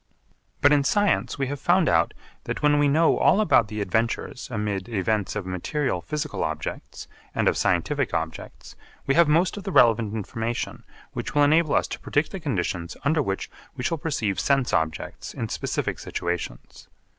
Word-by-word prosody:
But 145 +1 +6
in 145 -1 +4
science 205 +4 +1
we 135 - 0
have 140 +1 -4
found 175 -1 +3
out 85 0 +2 0.3
that - - -4
when 145 0 +4
we 145 - +4
know 160 +4 +3
all - - +4
about 155 - +4
the 105 0 -4
adventures 110 +5 -2
amid 105 -3 -3
events 105 -1 -1
of 105 -3 -3
material 95 - -2
physical 150 -1 -3
objects - - -5 0.3
and - - +1
of - - +3
scientific 130 - 0
objects 80 0 -5 0.3
we 135 - +2
have 170 +2 +5
most 170 +7 +2
of 200 - -6
the 195 - -4
relevant 115 - +4
information 115 +3 -4 0.3
which - - -5
will 145 - +5
enable 155 +1 +4
us - - +2
to - - -5
predict 145 +2 0
the 195 - -5
conditions 95 - -3
under 155 +2 +3
which 95 -7 -2 0.3
we 125 - -4
shall 165 +4 -1
perceive 110 - -1
sense 135 -3 +1
objects 80 -1 -2
in - - -3
specific - - -2
situations. 85 -8 -5
125 Hz, 175 wpm, -25 LUFS, 100-150 Hz, 0.3 s, But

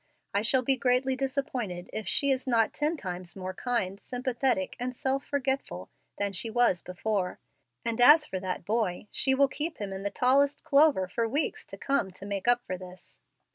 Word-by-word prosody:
I 200 - +2
shall 255 +4 +2
be 265 +1 +2
greatly 255 +1 +2
disappointed 255 -9 -3
if 215 - -4
she 280 -1 +1
is 260 0 -1
not 230 -3 +3
ten 300 +3 0
times 180 - -6
more 185 -1 -5
kind, 200 -3 -2
sympathetic, 250 -5 -1
and 250 +1 -3
self 270 +2 -1
forgetful 265 - -2 0.3
than 200 -1 -1
she 210 +5 -4
was 230 -6 +2
before; 180 +1 -2 0.5
and 230 0 -1
as 300 +5 +8
for 190 - -4
that 185 -2 -4
boy, 210 -2 -1
she 265 -1 +1
will 280 +1 +5
keep 305 +4 -4
him 200 -2 -4
in 190 - -5
the 200 - -1
tallest 275 +5 +2
clover 280 -9 +4
for 230 +5 -1
weeks 285 +7 -2
to - - -9
come, 275 -8 0
to 195 - -11
make 200 +1 -4
up 245 0 +4
for 185 -1 -4
this. 180 -1 -12
235 Hz, 190 wpm, -29 LUFS, 190-265 Hz, 0.5 s, as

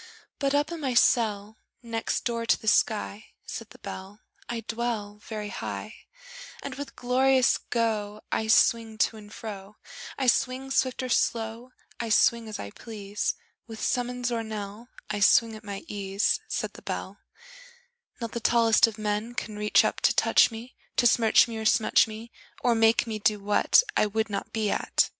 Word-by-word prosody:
But 280 0 +1
up 295 +3 +1
in 335 - -5
my 265 -5 -2
cell 220 -3 +2 0.3
Next 230 -1 -2
door 230 -1 -2
to - - +3
the 220 - -11
sky, 215 -1 +1 0.2
Said 230 0 -7
the 250 - -15
Bell, 200 0 -9 0.3
I 235 -1 -3
dwell 225 -2 -4
Very 210 -2 -5
high; - - -6 0.7
And 280 - -5
with 285 +1 -8
glorious 255 +1 +3
go 215 -3 -2
I 220 - 0
swing 225 0 +3
to 220 0 +1
and 210 -1 -13
fro; 210 -2 -8 0.4
I 270 - -1
swing 255 +2 +1
swift 260 -1 0
or 255 - -4
slow, 230 +1 -1 0.3
I 235 - -3
swing 230 +1 +3
as 215 - -5
I 100 - -7
please, 210 - -4 0.3
With 225 -1 -9
summons 245 0 -1
or 230 -1 -1
knell; 215 +1 -7 0.2
I 205 - -2
swing 225 +3 +4
at 215 - -11
my 200 -2 -6
ease, 200 0 0
Said - - -3
the - - -12
Bell: - - -5 1.0
Not 230 -2 -4
the 235 - -3
tallest 230 -1 +4
of 225 -1 -7
men 215 +2 -2
Can 215 -3 -4
reach 210 0 +4
up - - -1
to - - +3
touch - - +5
me, 230 +2 -10 0.2
To 245 - +2
smirch 230 0 +5
me 225 -1 -5
or 220 - -5
smutch 215 +1 +4
me, 220 +2 -9 0.3
Or 245 - +4
make 225 +1 +4
me 220 -2 -4
do 210 0 +2
what 205 - +4
I - - +3
would 220 +1 -2
not 200 - -4
be 215 -2 0
at! - - +1
225 Hz, 180 wpm, -27 LUFS, 210-240 Hz, 1.0 s, touch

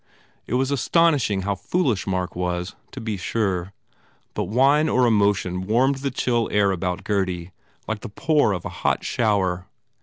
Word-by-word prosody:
It 120 - -1
was 135 +2 +1
astonishing 140 - +2
how 100 +1 0
foolish 120 - -1
Mark 90 -1 -2
was, 90 +1 -2 0.2
to - - -8
be 110 -2 -3
sure. 95 -1 -1 0.6
But - - -2
wine 135 - +3
or 125 0 +3
emo 105 -3 +4
tion 90 -1 -4
warmed 130 +5 +3
the 140 +1 -2
chill 120 -3 0
air 100 -1 +3
about 90 -1 -2
Gurdy 95 -4 -1 0.4
like 110 -1 -2
the - - -8
pour 150 +2 +2
of 90 -4 -3
a - - -3
hot - - +1
shower. 95 -5 0
105 Hz, 170 wpm, -23 LUFS, 95-125 Hz, 0.6 s, emo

